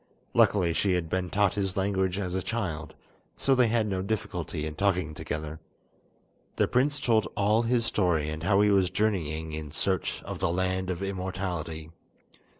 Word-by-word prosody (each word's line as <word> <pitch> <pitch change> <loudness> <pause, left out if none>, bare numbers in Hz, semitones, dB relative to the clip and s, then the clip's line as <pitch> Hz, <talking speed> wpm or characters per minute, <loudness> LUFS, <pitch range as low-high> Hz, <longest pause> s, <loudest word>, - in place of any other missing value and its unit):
Luckily 90 -5 +4
she 95 +2 +2
had 90 -3 -1
been 90 +1 -1
taught 100 -1 +2
his 95 -2 -2
language 95 -1 +1
as 90 -3 -2
a 95 - 0
child, 80 -9 -3 0.4
so 135 - +2
they 125 -2 +4
had 115 -1 +2
no 95 -3 -1
difficulty 95 -6 -3
in 80 - -4
talking 90 -3 0
together. 75 +1 -5 1.0
The - - +2
prince 145 +3 +2
told 115 -5 +2
all 105 +3 +3
his 120 0 +1
story 90 -8 +1
and 80 0 -5
how 95 +3 +3
he 105 0 +4
was 95 -2 +4
journeying 80 -6 -1
in 75 -1 -5
search 95 +4 -1
of - - -6
the - - +1
Land 95 +1 0
of 90 +1 -2
Immortality. 90 -4 -4
95 Hz, 170 wpm, -28 LUFS, 80-105 Hz, 1.0 s, Luckily